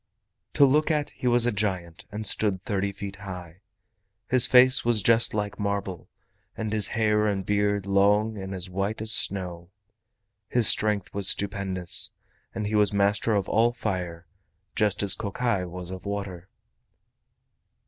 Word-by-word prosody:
To 140 Hz, -, +5 dB
look 150 Hz, +4 st, +2 dB
at 150 Hz, -2 st, -1 dB
he 125 Hz, -, -5 dB
was 120 Hz, -1 st, +3 dB
a 120 Hz, -, +1 dB
giant, 95 Hz, -6 st, -4 dB
and 105 Hz, +1 st, -6 dB
stood 100 Hz, -2 st, +1 dB
thirty 100 Hz, -2 st, -2 dB
feet 100 Hz, 0 st, -8 dB
high. 90 Hz, -2 st, -10 dB, 0.7 s
His 130 Hz, -2 st, +4 dB
face 130 Hz, 0 st, +6 dB
was 115 Hz, -4 st, +1 dB
just 115 Hz, 0 st, +3 dB
like 105 Hz, -1 st, -4 dB
marble, 100 Hz, -4 st, -4 dB, 0.5 s
and 110 Hz, -1 st, -4 dB
his 105 Hz, -2 st, +1 dB
hair 105 Hz, -1 st, +1 dB
and 95 Hz, -2 st, -2 dB
beard 105 Hz, -1 st, 0 dB
long 105 Hz, +3 st, +2 dB
and 95 Hz, -1 st, -7 dB
as 90 Hz, 0 st, -4 dB
white 100 Hz, +4 st, -3 dB
as 110 Hz, -, +2 dB
snow. 90 Hz, -5 st, 0 dB, 0.8 s
His 120 Hz, -3 st, +3 dB
strength 105 Hz, -2 st, +2 dB
was 100 Hz, -1 st, -2 dB
stupendous, 95 Hz, -3 st, +1 dB, 0.4 s
and 105 Hz, -, -3 dB
he 105 Hz, -, -4 dB
was 105 Hz, -2 st, +2 dB
master 100 Hz, +2 st, +1 dB
of 100 Hz, -, -1 dB
all 115 Hz, +2 st, +2 dB
fire 90 Hz, -7 st, -5 dB, 0.5 s
just 105 Hz, -3 st, +1 dB
as 100 Hz, -2 st, +2 dB
Kokai 100 Hz, -2 st, -2 dB
was 90 Hz, 0 st, -8 dB
of 95 Hz, -1 st, -8 dB
water. 100 Hz, -3 st, -6 dB
100 Hz, 155 wpm, -25 LUFS, 95-110 Hz, 0.8 s, face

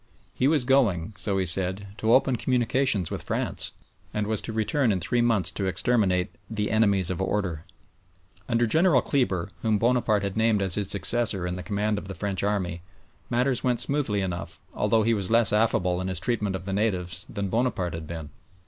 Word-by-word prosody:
He 130 Hz, -, +1 dB
was 150 Hz, -3 st, +3 dB
going, 110 Hz, -9 st, +2 dB
so 95 Hz, +1 st, -1 dB
he 95 Hz, -, +1 dB
said, 95 Hz, +3 st, +1 dB
to 110 Hz, 0 st, +1 dB
open 130 Hz, -1 st, +3 dB
communications 125 Hz, -5 st, +1 dB
with -, -, -4 dB
France, -, -, -2 dB, 0.4 s
and 105 Hz, 0 st, 0 dB
was 110 Hz, 0 st, -1 dB
to -, -, -5 dB
return 110 Hz, +3 st, +1 dB
in 95 Hz, -, 0 dB
three 120 Hz, +8 st, 0 dB
months 115 Hz, -5 st, +2 dB
to 100 Hz, -, -3 dB
exterminate 95 Hz, -4 st, +1 dB, 0.2 s
"the 105 Hz, -2 st, -2 dB
enemies 100 Hz, -5 st, +2 dB
of 90 Hz, -, -3 dB
order." 95 Hz, -5 st, -2 dB, 0.8 s
Under 120 Hz, 0 st, +2 dB
General 160 Hz, +2 st, +3 dB
Kleber, 95 Hz, -, 0 dB
whom 110 Hz, -2 st, +2 dB
Bonaparte 115 Hz, -2 st, +2 dB
had 100 Hz, -1 st, -3 dB
named 110 Hz, -1 st, +2 dB
as 95 Hz, -2 st, -1 dB
his 100 Hz, -1 st, 0 dB
successor 100 Hz, +1 st, +2 dB
in 90 Hz, 0 st, -3 dB
the 90 Hz, -, -5 dB
command 105 Hz, +1 st, -1 dB
of 100 Hz, -, -11 dB
the 95 Hz, -, -6 dB
French 100 Hz, -3 st, -3 dB
army, 95 Hz, -4 st, -1 dB, 0.5 s
matters 125 Hz, +1 st, 0 dB
went 125 Hz, -3 st, +1 dB
smoothly 130 Hz, -8 st, 0 dB
enough, 90 Hz, -2 st, -5 dB
although 110 Hz, -1 st, +2 dB
he 115 Hz, +2 st, +2 dB
was 100 Hz, -4 st, -2 dB
less 115 Hz, -3 st, +3 dB
affable 95 Hz, -5 st, +1 dB
in 95 Hz, -, -3 dB
his 95 Hz, -3 st, -2 dB
treatment 105 Hz, -2 st, -1 dB
of 95 Hz, 0 st, -6 dB
the 95 Hz, -, -3 dB
natives 95 Hz, -3 st, -1 dB
than 100 Hz, -2 st, -3 dB
Bonaparte 110 Hz, -7 st, -1 dB
had 80 Hz, -1 st, -6 dB
been. 80 Hz, -3 st, -7 dB
105 Hz, 195 wpm, -26 LUFS, 95-115 Hz, 0.8 s, was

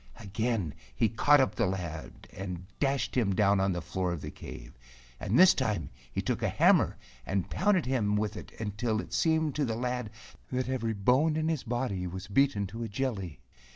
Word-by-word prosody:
Again 105 Hz, -, -2 dB, 0.2 s
he 110 Hz, -, +2 dB
caught 145 Hz, +6 st, +5 dB
up 130 Hz, -, +2 dB
the 115 Hz, -, +1 dB
lad 85 Hz, -4 st, -5 dB
and 90 Hz, -2 st, -6 dB
dashed 135 Hz, -1 st, 0 dB
him 105 Hz, -7 st, +2 dB
down 100 Hz, -1 st, +4 dB
on 95 Hz, 0 st, +2 dB
the 85 Hz, -2 st, -3 dB
floor 90 Hz, +1 st, -2 dB
of 85 Hz, -4 st, -4 dB
the -, -, -6 dB
cave, -, -, -10 dB, 0.4 s
and 105 Hz, -, 0 dB
this 185 Hz, 0 st, +8 dB
time 105 Hz, -, -1 dB, 0.2 s
he -, -, -2 dB
took -, -, -1 dB
a -, -, +1 dB
hammer -, -, +4 dB, 0.3 s
and 95 Hz, +6 st, -2 dB
pounded 190 Hz, -5 st, +2 dB
him 115 Hz, -5 st, +1 dB
with 105 Hz, 0 st, -1 dB
it -, -, -9 dB
until 110 Hz, +1 st, -1 dB
it -, -, -7 dB
seemed 160 Hz, -2 st, +2 dB
to 150 Hz, -, +2 dB
the 115 Hz, -4 st, -1 dB
lad 125 Hz, -1 st, -2 dB, 0.4 s
that 130 Hz, 0 st, -1 dB
every 115 Hz, -4 st, -1 dB
bone 130 Hz, +10 st, +3 dB
in 160 Hz, +1 st, 0 dB
his 160 Hz, -5 st, 0 dB
body 120 Hz, -7 st, -2 dB
was 95 Hz, +2 st, -6 dB
beaten 105 Hz, -1 st, +2 dB
to 110 Hz, +5 st, -7 dB
a 115 Hz, -, -2 dB
jelly. 100 Hz, -, -3 dB
110 Hz, 195 wpm, -30 LUFS, 95-130 Hz, 0.4 s, this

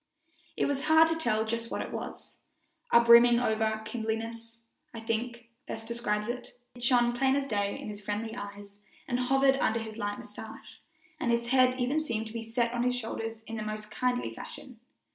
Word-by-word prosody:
It -, -, +2 dB
was 280 Hz, -1 st, -1 dB
hard 320 Hz, +1 st, +6 dB
to 325 Hz, -, +1 dB
tell 220 Hz, -9 st, +1 dB
just 230 Hz, +1 st, -3 dB
what -, -, -2 dB
it -, -, -8 dB
was -, -, -7 dB, 0.5 s
a 235 Hz, -, +8 dB
brimming 235 Hz, 0 st, +7 dB
over 220 Hz, -2 st, 0 dB
kindliness, 230 Hz, +1 st, -4 dB, 0.3 s
I -, -, -5 dB
think, 235 Hz, +1 st, -3 dB, 0.2 s
best 225 Hz, 0 st, -6 dB
describes 210 Hz, -3 st, -1 dB
it. 245 Hz, +1 st, -6 dB, 0.2 s
It 245 Hz, -, -13 dB
shone 240 Hz, -1 st, +3 dB
plain 265 Hz, +2 st, +2 dB
as 280 Hz, -1 st, 0 dB
day 205 Hz, -5 st, -1 dB
in -, -, -7 dB
his 210 Hz, -1 st, -7 dB
friendly 210 Hz, +3 st, -3 dB
eyes 205 Hz, -2 st, -8 dB, 0.3 s
and 245 Hz, -1 st, 0 dB
hovered 270 Hz, +1 st, +3 dB
under 230 Hz, -3 st, +1 dB
his 220 Hz, 0 st, -7 dB
light 205 Hz, -1 st, -2 dB
mustache, -, -, -10 dB, 0.4 s
and 255 Hz, -, -1 dB
his 235 Hz, 0 st, +1 dB
head 255 Hz, 0 st, +4 dB
even 265 Hz, +5 st, +1 dB
seemed 230 Hz, -7 st, -2 dB
to 220 Hz, -, -9 dB
be 230 Hz, -, -3 dB
set 235 Hz, +1 st, -1 dB
on 240 Hz, -, -1 dB
his 250 Hz, 0 st, +2 dB
shoulders 225 Hz, -1 st, -5 dB
in 225 Hz, 0 st, -6 dB
a -, -, -3 dB
most 215 Hz, 0 st, -5 dB
kindly 250 Hz, +1 st, -1 dB
fashion. 250 Hz, -4 st, -10 dB
235 Hz, 195 wpm, -29 LUFS, 220-245 Hz, 0.5 s, a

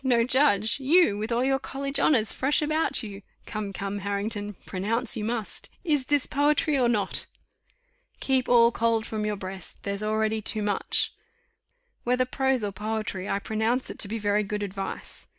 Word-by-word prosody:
No 240 Hz, -3 st, +3 dB
judge! 245 Hz, -4 st, +4 dB
You! 285 Hz, -, +4 dB
with 215 Hz, +3 st, -3 dB
all 235 Hz, +2 st, +1 dB
your 270 Hz, 0 st, +2 dB
college 275 Hz, +1 st, -2 dB
honours 230 Hz, -8 st, +3 dB
fresh 285 Hz, +3 st, +2 dB
about 310 Hz, -3 st, +1 dB
you. 200 Hz, -2 st, -8 dB, 0.2 s
Come, 210 Hz, -2 st, -4 dB
come, 200 Hz, +1 st, -4 dB
Harrington, 205 Hz, +1 st, -2 dB
pronounce 220 Hz, +6 st, -1 dB
you 215 Hz, -, -3 dB
must. 225 Hz, -1 st, -4 dB
Is 295 Hz, -7 st, 0 dB
this 290 Hz, -2 st, +3 dB
poetry 295 Hz, +1 st, +2 dB
or 250 Hz, -3 st, +3 dB
not? 210 Hz, -4 st, 0 dB, 0.9 s
'Keep 260 Hz, -2 st, +1 dB
all 235 Hz, -1 st, +6 dB
cold 230 Hz, -1 st, +1 dB
from 215 Hz, -1 st, -3 dB
your 210 Hz, -, -1 dB
breast, 190 Hz, -2 st, -8 dB
there's 200 Hz, 0 st, -3 dB
already 215 Hz, 0 st, 0 dB
too 215 Hz, 0 st, -1 dB
much.'" 205 Hz, -1 st, 0 dB, 0.9 s
"Whether 250 Hz, +1 st, +2 dB
prose 265 Hz, -1 st, 0 dB
or 205 Hz, -, -1 dB
poetry, 210 Hz, -1 st, -4 dB
I -, -, +1 dB
pronounce 220 Hz, +5 st, -1 dB
it -, -, -11 dB
to -, -, +2 dB
be 225 Hz, +3 st, -3 dB
very 205 Hz, -1 st, +1 dB
good 210 Hz, 0 st, -3 dB
advice." 195 Hz, -1 st, -6 dB
220 Hz, 170 wpm, -26 LUFS, 205-260 Hz, 0.9 s, all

